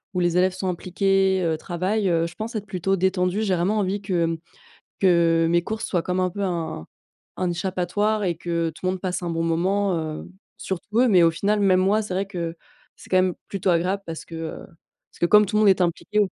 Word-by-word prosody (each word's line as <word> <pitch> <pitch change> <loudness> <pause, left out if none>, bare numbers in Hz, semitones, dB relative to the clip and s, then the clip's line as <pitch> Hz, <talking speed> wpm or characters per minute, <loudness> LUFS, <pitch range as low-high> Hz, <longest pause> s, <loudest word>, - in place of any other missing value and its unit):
où - - +1
les 175 0 +1
élèves 185 0 +3
sont 190 0 -3
impliqués, 190 +1 +1
heu, 160 -2 0
travaillent, 190 +5 -1
heu, 165 -1 +2
je 170 +1 -7
pense 220 +5 -6
être 210 -1 -3
plutôt 195 0 -1
détendue. 185 +1 0
J'ai 195 -3 +1
vraiment 190 +5 +1
envie 200 +1 -1
que, 180 -4 0
mmh, 165 0 -2 0.6
que 170 -3 +4
mes 170 0 +3
cours 220 +4 -4
soient 175 -3 -1
comme 180 +1 -2
un 185 0 +1
peu 200 - -5
un 165 - -3 0.5
un 180 -1 0
échappatoire, 190 +4 -1
et 175 -2 0
que 170 -1 -1
tout 160 +3 -10
le 185 - +2
monde 185 -1 -5
passe 185 -1 -3
un 170 - -2
bon 165 0 -1
moment, 185 +3 +1
heu, 155 -1 -5 0.3
surtout 210 +4 -3
eux, 255 - +5
mais 180 -6 +5
au 165 - +5
final 205 +5 0
même 185 -2 +4
moi. 200 +4 +2
C'est 205 -3 -5
vrai 190 +2 0
que 170 -4 -4 0.4
c'est - - -16
quand 185 - +3
même 185 -1 +2
plutôt 195 -1 -2
agréable, 185 +4 0
parce 165 -1 -6
que, 165 - -9
heu, 160 0 -6 0.5
parce - - -20
que - - +3
comme 210 +2 +6
tout 210 - -4
le 215 - +4
monde 210 - +6
est 190 -1 +3
impliqué, 175 +4 0
185 Hz, 235 wpm, -23 LUFS, 170-195 Hz, 0.6 s, comme